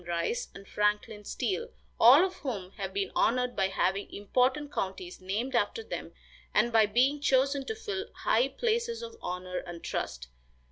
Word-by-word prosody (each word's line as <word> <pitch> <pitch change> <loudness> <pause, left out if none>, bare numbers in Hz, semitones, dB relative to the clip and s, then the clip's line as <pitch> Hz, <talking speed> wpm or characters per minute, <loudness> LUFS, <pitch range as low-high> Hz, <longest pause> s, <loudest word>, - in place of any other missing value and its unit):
Rice 175 - -1
and 195 0 -11
Franklin 210 0 0
Steele, 455 - -2 0.3
all 270 +10 +8
of 375 - -5
whom 205 - -4
have 195 -2 -5
been 195 0 -2
honored 250 +1 +2
by 195 -1 +2
having 195 +1 0
important 255 +8 0
counties 185 -1 -4
named 215 +8 -2
after 240 - +1
them - - -6 0.4
and 230 +2 +3
by 220 -2 +6
being 260 +7 +2
chosen 275 0 +2
to 445 - -3
fill 415 -1 -4
high 240 +4 +2
places 465 - -1
of 460 -1 -7
honor 180 0 -4
and 175 -1 -9
trust. 60 -1 -4
235 Hz, 160 wpm, -30 LUFS, 195-295 Hz, 0.4 s, all